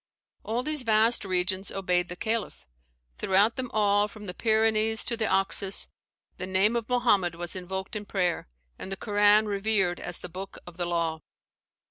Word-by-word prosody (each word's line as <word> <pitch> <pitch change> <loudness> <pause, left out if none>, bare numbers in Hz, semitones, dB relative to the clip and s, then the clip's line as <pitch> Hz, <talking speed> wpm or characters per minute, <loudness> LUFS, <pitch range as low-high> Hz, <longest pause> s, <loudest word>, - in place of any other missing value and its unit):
All 235 +3 -1
these 305 -1 -1
vast 225 0 +3
regions 185 0 -1
obeyed 180 -2 0
the 175 - -5
Caliph; 220 - -2 0.5
throughout 200 +4 +3
them 255 -2 -3
all, 205 -1 +3
from 210 0 -11
the 180 - -5
Pyrenees 220 +1 +2
to 235 - 0
the 220 -1 -1
Oxus, 195 0 +1 0.5
the 185 - -5
name 190 +4 +2
of 235 -1 -2
Mohammed 205 -9 +2
was 175 +1 -5
invoked 190 +2 -5
in 210 -1 -4
prayer, 180 - -1 0.3
and 190 - -6
the 195 - -3
Koran 210 +1 +4
revered 200 -3 +1
as 175 - -4
the - - -8
book 190 +3 -8
of 175 -1 -11
the 175 -1 -1
law. 165 -2 -1
200 Hz, 170 wpm, -27 LUFS, 180-220 Hz, 0.5 s, Koran